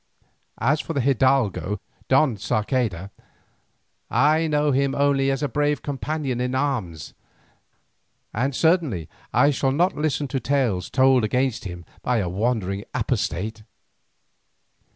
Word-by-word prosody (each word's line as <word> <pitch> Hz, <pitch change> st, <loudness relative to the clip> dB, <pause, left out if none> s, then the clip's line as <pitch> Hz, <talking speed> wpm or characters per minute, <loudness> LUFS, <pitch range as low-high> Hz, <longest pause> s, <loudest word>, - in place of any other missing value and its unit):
As 145 Hz, +6 st, +1 dB
for 165 Hz, -, -5 dB
the 140 Hz, -, 0 dB
hidalgo 130 Hz, -6 st, +1 dB, 0.3 s
Don 135 Hz, -2 st, +3 dB
Sarceda, 105 Hz, -2 st, -1 dB, 1.0 s
I 155 Hz, +6 st, +3 dB
know 150 Hz, -1 st, +2 dB
him 135 Hz, 0 st, +1 dB
only 140 Hz, -1 st, +2 dB
as 135 Hz, +1 st, -1 dB
a -, -, +2 dB
brave 145 Hz, +3 st, 0 dB
companion 140 Hz, -2 st, -3 dB
in 125 Hz, +1 st, -1 dB
arms, 120 Hz, -, -2 dB, 1.2 s
and 130 Hz, +4 st, -1 dB
certainly 160 Hz, -, +1 dB, 0.2 s
I 145 Hz, -, +4 dB
shall 135 Hz, -1 st, 0 dB
not 175 Hz, +7 st, +2 dB
listen 150 Hz, -1 st, -1 dB
to 135 Hz, -, -1 dB
tales 125 Hz, -10 st, 0 dB
told 130 Hz, -2 st, +4 dB
against 125 Hz, +1 st, 0 dB
him 90 Hz, -2 st, -7 dB, 0.2 s
by 125 Hz, -1 st, 0 dB
a 100 Hz, -5 st, 0 dB
wandering 100 Hz, -1 st, -1 dB
apostate. 110 Hz, -3 st, -2 dB
130 Hz, 125 wpm, -23 LUFS, 110-145 Hz, 1.2 s, I